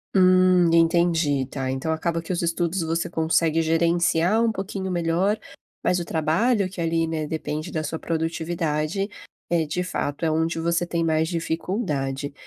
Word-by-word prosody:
Hum, 185 -2 +5
entendi! 165 -4 +3
Tá, 130 0 -4
então 135 +5 -2
acaba 165 +1 -1
que 165 +3 -4
os 175 - -1
estudos 170 +1 0
você 165 +1 -1
consegue 165 0 +1
gerenciar 170 +5 +2
um 230 - +2
pouquinho 190 -2 -4
melhor, 175 +5 +1 0.5
mas 180 - +2
o 170 - -4
trabalho 185 +8 +1
que 185 -2 -7
ali, 165 0 +1
né, 160 -2 -3
depende 155 -1 -4
da 155 -1 -2
sua 160 +1 -4
produtividade, 165 +2 -2 0.4
é 165 -3 +2
de 180 +4 -2
fato, 145 -3 -3
é 160 - +2
onde 165 +1 0
você 170 +1 +1
tem 170 -1 -1
mais 160 0 +1
dificuldade, 160 - -2
165 Hz, 160 wpm, -24 LUFS, 160-175 Hz, 0.5 s, Hum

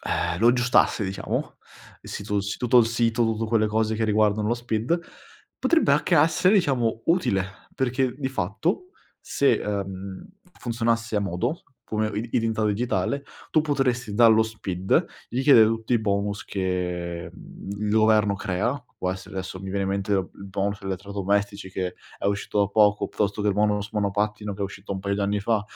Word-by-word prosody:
eh, - - -1
lo 115 +3 +5
aggiustasse 120 -3 +3
diciamo, 95 0 -3 0.5
il - - -12
sito 100 0 -2
s 100 +1 -4
tutto 125 0 +4
il 115 - +5
sito, 115 0 +1
tutte 115 0 0
quelle 110 -1 +2
cose 110 +1 0
che 110 +1 0
riguardano 105 0 +2
lo 120 - +2
SPID, 120 +6 -1 0.6
potrebbe 325 - +3
anche 150 +4 +3
essere 165 +6 +4
diciamo 125 - +1
utile, 165 - +2 0.3
perché 130 0 0
di 135 -2 -2
fatto 135 - -2 0.3
se, 140 -3 +2
ehm, 100 - -5 0.3
funzionasse 115 -1 -1
a - - +2
modo 100 - -2 0.2
come 110 0 -1
i 115 +3 -3
identità 110 -1 +1
digitale 120 +6 0 0.3
tu 155 - +4
potresti 125 -7 0
dallo 110 0 +6
SPID, 95 -4 0 0.2
richiedere 125 -3 +6
tutti 115 +2 -2
i 115 - +4
bonus 100 -1 -1
che, 90 -3 -3
mhmm, 100 +3 -9
il - - 0
governo 110 -1 +4
crea, 105 +8 -2
può 90 - -1
essere 95 +1 -7
adesso 95 0 -5
mi 95 - -7
viene 100 +1 -1
in 95 - -1
mente 100 +1 -1
il 100 0 -2
bonus 100 +1 -2
elettrodomestici 100 +1 -2
che 90 -1 -3 0.2
è - - -8
uscito 100 +1 0
da 100 - +3
poco, 105 0 +3
piuttosto 100 +1 -1
che 105 - +2
il 100 - +1
bonus 105 0 +1
monopattino 105 0 -1
che 100 - -11
è - - +1
uscito 100 0 -7
un 95 - -4
paio 100 +1 -1
di - - -2
anni 100 +1 0
fa, 105 +1 +1
105 Hz, 175 wpm, -25 LUFS, 100-115 Hz, 0.6 s, dallo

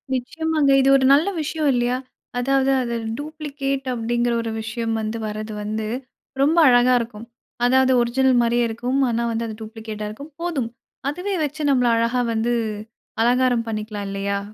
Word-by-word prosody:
நிச்சயமாங்க. 315 +3 0
இது 270 - +3
ஒரு 265 - +1
நல்ல 310 +7 +4
விஷயம் 305 0 0
இல்லையா? 245 +1 +1 0.4
அதாவது 270 +1 +2
அது 235 -1 -2 0.2
டூப்ளிகேட் 285 -3 -4
அப்படிங்கிற 240 +1 0
ஒரு 225 -1 -4
விஷயம் 225 +1 -3
வந்து 215 +1 -3
வர்றது 215 +1 -5
வந்து, 215 +1 -3 0.5
ரொம்ப 310 +5 +3
அழகா 245 +1 +5
இருக்கும். 230 -1 -7 0.4
அதாவது 260 +1 +4
ஒரிஜினல் 255 +1 +3
மாதிரியே 235 0 +2
இருக்கும். 245 +4 -1
ஆனா 235 0 0
வந்து 230 0 -2
அது 220 - -6
டூப்ளிகேட்டா 220 -1 -6
இருக்கும். 280 +9 -10
போதும், 295 -10 -2 0.4
அதுவே 365 +6 -3
வச்சு 295 +2 -6
நம்மள 250 -2 +3
அழகா 235 +2 +1
வந்து 225 +2 0 0.7
அலங்காரம் 245 -1 +2
பண்ணிக்கலாம் 210 -2 -4
இல்லையா! 200 0 -2
240 Hz, 150 wpm, -22 LUFS, 225-275 Hz, 0.7 s, அழகா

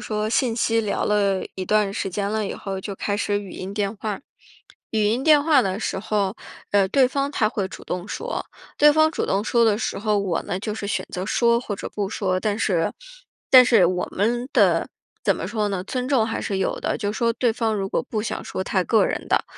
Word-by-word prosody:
说 215 -1 -1
信 230 +1 +1
息 230 -1 +2
聊 210 -2 -1
了 200 -2 +1
一 185 -1 -5
段 210 -1 +2
时 200 - -2
间 200 +2 -2
了 215 -1 -1
以 - - -4
后， 195 -1 -5
就 200 +1 -6
开 205 +1 -2
始 205 -1 0
语 200 -2 -8
音 190 +3 -7
电 205 0 -1
话。 210 -1 -4 0.7
语 215 -1 +1
音 230 +6 +1
电 300 -2 +6
话 300 -3 +5
的 190 -3 -1
时 190 - -2
候， 205 0 -1 0.3
呃， 200 -1 +4
对 260 +6 +4
方 275 +1 -1
他 215 -6 +2
会 205 -4 -2
主 190 - -10
动 180 +1 -4
说。 485 - -4 0.3
对 295 0 +7
方 315 +1 +4
主 - - -2
动 195 +1 +1
说 235 +1 +2
的 215 -2 +3
时 215 - -3
候， 210 0 +1
我 190 -4 -1
呢 180 - -3
就 215 0 -3
是 210 -2 -5
选 - - -2
择 185 +1 -4
说 235 +1 +3
或 225 -4 -4
者 - - -6
不 205 -2 -3
说。 190 -3 -1
但 205 +1 -1
是 180 -7 0 0.6
但 255 -1 +9
是 230 -7 +5
我 180 0 -1
们 240 +6 0
的 - - +3 0.4
怎 - - +3
么 - - -5
说 215 -2 -1
呢？ 195 -3 -2
尊 250 +6 -3
重 260 -6 +3
还 225 - -3
是 195 -3 -2
有 190 - -1
的。 - - -1
就 205 -2 -2
说 230 +1 +1
对 240 0 +1
方 225 -1 -1
如 195 -1 -2
果 - - 0
不 220 -5 -3
想 - - -4
说 185 - -4
他 190 -1 0
个 225 - +3
人 - - -3
的 - - +1
210 Hz, 255 characters per minute, -23 LUFS, 195-235 Hz, 0.7 s, 但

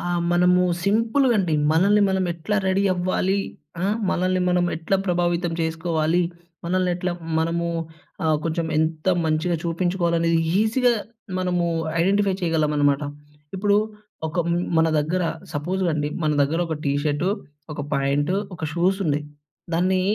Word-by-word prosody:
ఆహ్, 175 0 -1
మనము 180 +1 +4 0.2
సింపుల్‌గ 230 +6 +3
అండి, 175 -5 +1 0.2
మనల్ని 200 +6 +4
మనం 190 -1 +1
ఎట్ల 170 +5 -6
రెడీ 190 +1 +2
అవ్వాలి. 185 +2 0 0.4
ఆ - - -2 0.3
మనల్ని 185 +1 +1
మనం 180 0 +2
ఎట్లా 165 +4 0
ప్రభావితం 175 -1 0
చేసుకోవాలి. 160 +1 0 0.4
మనల్నెట్లా 180 0 0 0.3
మనము 165 +1 0 0.6
ఆహ్, 155 -1 +3
కొంచెం 165 0 -1
ఎంత 160 +1 -1 0.2
మంచిగా 160 +2 +1
చూపించుకోవాలనేది 170 -1 +1 0.2
ఈజీగా 240 +3 +3 0.5
మనము 180 -1 0 0.4
ఐడెంటిఫై 195 +2 +2
చేయగలమనమాట. 150 -4 +2 0.5
ఇప్పుడు 200 +1 +2 0.5
ఒక 165 - -5 0.4
మన 160 0 +4
దగ్గర 170 +5 0 0.3
సపోజ్ 180 +6 -2
అండి, 150 -1 -1 0.2
మన 155 - +2
దగ్గర 150 +4 0
ఒక 160 - -2
టీ 140 - +1
షర్టు, 150 +4 0 0.5
ఒక 145 - -5
ప్యాంటు, 140 +5 +1 0.2
ఒక 160 - -5
షూస్ 180 +4 +1
ఉన్నై. 150 -2 0 0.5
దాన్ని 185 +3 +2
175 Hz, 130 wpm, -23 LUFS, 160-185 Hz, 0.6 s, మనము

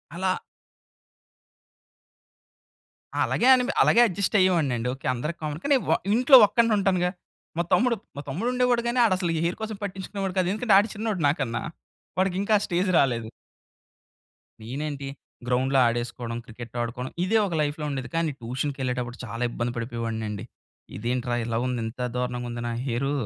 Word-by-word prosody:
అలా 185 +1 0 2.9
అలాగే 245 - +1
అని 250 -1 +2 0.2
అలాగే 235 - +5
అడ్జస్ట్ 200 +1 0
అయ్యేవాడినండి. 145 -10 +2
ఓకే. 135 - -10
అందరికి 150 +8 -4
కామన్ 150 +1 -3
కానీ 285 -1 +4
వ - - +3 0.2
ఇంట్లో 255 +3 +7
ఒక్కడినే 230 -1 +2
ఉంటాను 190 -2 +2
గా. 180 - +1 0.5
మా - - +3
తమ్ముడు, 245 -1 +4 0.2
మా 145 - -5
తమ్ముడు 190 - -2
ఉండేవాడు 250 -1 +2
కానీ, 245 +1 0
ఆడు 200 -5 +4
అసలు 175 -3 -1
ఈ - - 0
హెయిర్ 175 - -1
కోసం 220 -1 -4
పట్టించుకునేవాడు 195 0 -4
కాదు. 180 -1 +2
ఎందుకంటే 215 -1 +2
ఆడు 210 +3 +2
చిన్నోడు, 210 -4 -2
నాకన్నా 125 -5 -1 0.6
వాడికి 185 -1 +1
ఇంకా 215 +1 +2
ఆ - - -7
స్టేజ్ 180 +2 0
రాలేదు. 120 -4 +1 1.3
నేనేంటి, 140 +3 -4 0.4
గ్రౌండ్‌లో 130 +2 +2
ఆడేసుకోవడం, 120 0 -2
క్రికెట్ 120 0 -10
ఆడుకోవడం 125 +2 -4
ఇదే 220 +4 +3
ఒక 170 - -4
లైఫ్‌లో 150 +1 -2
ఉండేది. 130 -3 -4
కానీ 165 -2 +1
ట్యూషన్‌కి 135 +4 -3
వెళ్ళేటప్పుడు 125 -1 -3
చాలా 115 +1 -5
ఇబ్బంది 120 0 -2
పడిపోయేవాడినండి. 115 -3 -4 0.5
"ఇదేంట్రా 120 +1 -1
ఇలా 115 0 -1
ఉంది. 125 -2 -1
ఇంత 120 +3 -8 0.2
దారుణంగా 125 -1 -2
ఉంది 120 0 -5
నా - - -2
హెయిరు, 135 +3 -1
145 Hz, 155 wpm, -26 LUFS, 120-195 Hz, 2.9 s, ఇంట్లో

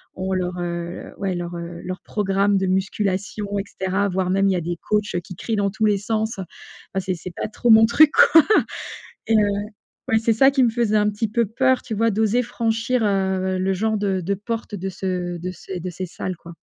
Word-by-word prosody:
ont 190 +1 -3
leur, 180 -1 -1
heu, 170 0 -5
ouais, 195 -2 -2
leur, 175 0 -5
heu, 170 0 -7
leur 185 0 -5
programme 200 -1 +1
de 190 -1 0
musculation 195 +2 -1
et - - -2
cetera. 190 +1 -1
Voire 185 -1 -1
même, 195 +1 +2
il 195 - +3
y - - 0
a 175 - -1
des 170 +1 -3
coachs, 210 0 0
heu, - - +1
qui 175 0 -10
crient 225 +4 -3
dans 200 -1 +1
tous 220 +1 0
les 210 -1 +3
sens. 220 +1 -2 0.5
Ah 190 - 0
c'est 185 -1 -2
c'est 175 +2 -8
pas - - -3
trop 240 +3 -2
mon 220 0 +8
truc, 300 +6 +6 0.2
quoi. 320 -3 +9 0.9
Et 225 - +3
heu, - - +5 0.7
ouais, 220 - +4
c'est 225 +1 +2
ça 270 +5 +5
qui 270 - +2
me 240 - +4
faisait 225 -2 0
un 210 0 +3
petit 210 +2 -2
peu 230 +2 +1
peur, 260 +4 +2
tu 220 - -5
vois, 230 +2 +2
d'oser 220 +4 +2
franchir, 230 +1 -1
heu, 190 -2 0
le 190 +1 0
genre, 220 +3 0
de 195 -2 -1
de 195 +4 -1
porte, 225 +2 -5
heu, - - -5
de 195 +2 -4
ce 180 -2 -3
de 180 +2 -4
ces 180 +1 -7
de 185 - -4
ces 180 +2 -5
salles, 185 +1 -5
quoi. 170 0 -12
195 Hz, 235 wpm, -22 LUFS, 185-220 Hz, 0.9 s, quoi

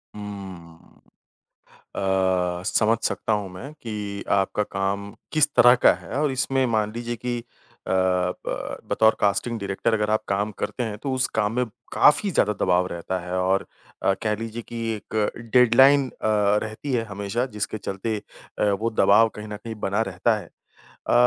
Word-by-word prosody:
हुँ। 95 -5 -10 0.9
अ, 95 -2 0
समझ 110 +1 +2
सकता 110 - 0
हूँ 105 -3 -2
मैं 135 +11 -8
कि 105 -7 -6
आपका 100 +1 +2
काम 100 0 -3 0.2
किस 155 -1 +5
तरह 120 +1 +8
का 125 - +5
है। - - -11
और 150 -2 +1
इसमें 130 0 +1
मान 110 -2 0
लीजिए 120 0 -4
कि 120 +1 -4 0.4
अ, - - -1
ब 90 -1 -1
बतौर 110 0 +4
कास्टिंग 105 +4 +1
डायरेक्टर 100 +3 -1
अगर 105 -1 +1
आप 110 0 +1
काम 100 +2 0
करते 125 - -2
हैं 110 -3 -4
तो 135 - -1
उस 130 0 +1
काम 105 0 +1
में 125 0 +1 0.3
काफ़ी 175 +7 +4
ज़्यादा 105 -8 +2
दबाव 90 0 +2
रहता 90 +2 -4
है। 90 +1 -5
और 95 +1 +1 0.4
अ, 95 - +4
कह 105 -1 +1
लीजिए 115 +1 -5
कि 115 0 -6
एक 105 +1 -2 0.2
डेडलाइन 130 +3 +6
अ, - - -18
रहती 110 +4 +1
है 115 - +1
हमेशा 100 +3 -2
जिसके 105 +1 -2
चलते 100 +3 -3 0.4
अ, - - +2
वो 110 +4 0
दबाव 115 +3 +6
कहीं 105 0 -7
न 105 0 -6
कहीं 115 +1 -7
बना 100 +3 +1
रहता 105 +5 +1
है। - - -12 0.6
अ, - - +3
105 Hz, 170 wpm, -24 LUFS, 95-115 Hz, 0.9 s, तरह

